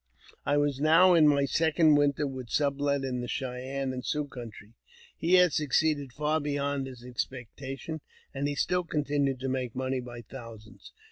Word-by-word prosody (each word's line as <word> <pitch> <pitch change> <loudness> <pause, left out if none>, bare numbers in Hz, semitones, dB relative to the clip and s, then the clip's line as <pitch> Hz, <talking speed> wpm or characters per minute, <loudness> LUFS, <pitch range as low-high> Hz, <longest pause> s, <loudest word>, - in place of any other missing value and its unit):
I 145 0 +3
was 145 -2 +1
now 165 +4 +6
in 160 -3 +6
my 140 -1 +4
second 160 +3 +3
winter 145 0 +2
with 130 -3 -6
Sublet 140 -1 +1
in 125 -2 -2
the 120 - -4
Cheyenne 130 +1 -3
and 125 -1 -5
Sioux 150 +2 -1
country. 115 -5 -10 0.4
He 170 +3 +2
had 180 -3 +5
succeeded 150 -1 +1
far 150 +4 0
beyond 145 -2 -2
his 125 -2 -11
ex 125 -1 -2
pectation, 135 +5 -7 0.3
and 140 +1 -1
he 145 - -2
still 180 +5 +1
continued 145 -4 0
to 135 - -2
make 130 -2 -2
money 130 0 -1
by 120 -1 -8
thousands. 115 -3 -12
140 Hz, 175 wpm, -29 LUFS, 130-150 Hz, 0.4 s, now